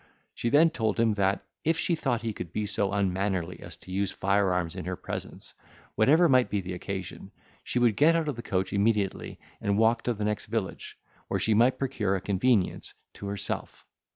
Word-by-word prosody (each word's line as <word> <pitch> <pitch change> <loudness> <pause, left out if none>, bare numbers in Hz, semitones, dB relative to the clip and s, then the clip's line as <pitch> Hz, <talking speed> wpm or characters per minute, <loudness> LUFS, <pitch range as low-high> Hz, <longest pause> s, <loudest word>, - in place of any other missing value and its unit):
She 120 - -2
then 160 +5 +5
told 110 -8 -1
him 115 -2 +3
that, 100 -1 0 0.2
if 165 +1 +2
she 165 +2 0
thought 125 -7 -1
he 115 -2 -2
could 90 - -7
be 105 - -2
so 100 -1 0
unmannerly 95 -3 -1
as - - -8
to 95 - -13
use 100 0 0
fire 100 0 +1
arms 90 -3 -1
in - - -6
her 90 0 -3
presence, - - -7 0.4
whatever 155 +10 +5
might 130 -3 +4
be 105 - 0
the 90 -1 -5
occasion, 95 +1 -6 0.3
she - - -3
would 120 -3 +3
get 160 +7 +5
out 165 -2 0
of 145 - -1
the 120 - -6
coach 95 -4 -2
immediately, 100 -1 0 0.2
and 100 0 +1
walk 115 +1 +3
to 120 - 0
the 105 0 -3
next 105 0 -2
village, 105 -3 -4 0.3
where - - -1
she 110 - +2
might 120 +4 +4
procure 105 -8 -1
a - - -1
convenience 100 +2 0 0.2
to 100 - -8
herself. 100 0 -4
105 Hz, 205 wpm, -28 LUFS, 95-120 Hz, 0.4 s, then